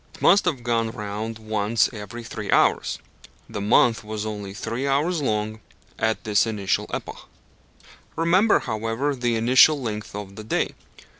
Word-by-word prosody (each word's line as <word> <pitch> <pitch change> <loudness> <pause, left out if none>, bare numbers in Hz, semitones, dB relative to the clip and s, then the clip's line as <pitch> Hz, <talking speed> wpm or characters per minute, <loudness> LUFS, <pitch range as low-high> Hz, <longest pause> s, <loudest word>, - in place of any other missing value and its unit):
It - - -16
must 200 +3 +5
have 140 -9 -1
gone 115 -1 0
round 110 +1 -5
once 110 0 +1
every 110 +2 -8
three 105 -2 -7
hours. - - +2 0.5
The 100 - -5
month 115 +2 +3
was 105 0 -5
only 105 -2 -5
three 115 +5 -4
hours 150 +5 +1
long 110 -3 -1 0.4
at 110 0 0
this 105 0 +2
initial 100 -3 -1
epoch. - - -6 0.9
Remember, 185 +6 +3
however, 115 +4 -2
the 120 -2 0
initial 130 +6 +5
length 105 -5 -5
of 100 -1 -7
the 110 - -7
day. 110 - -1
110 Hz, 150 wpm, -24 LUFS, 105-125 Hz, 0.9 s, must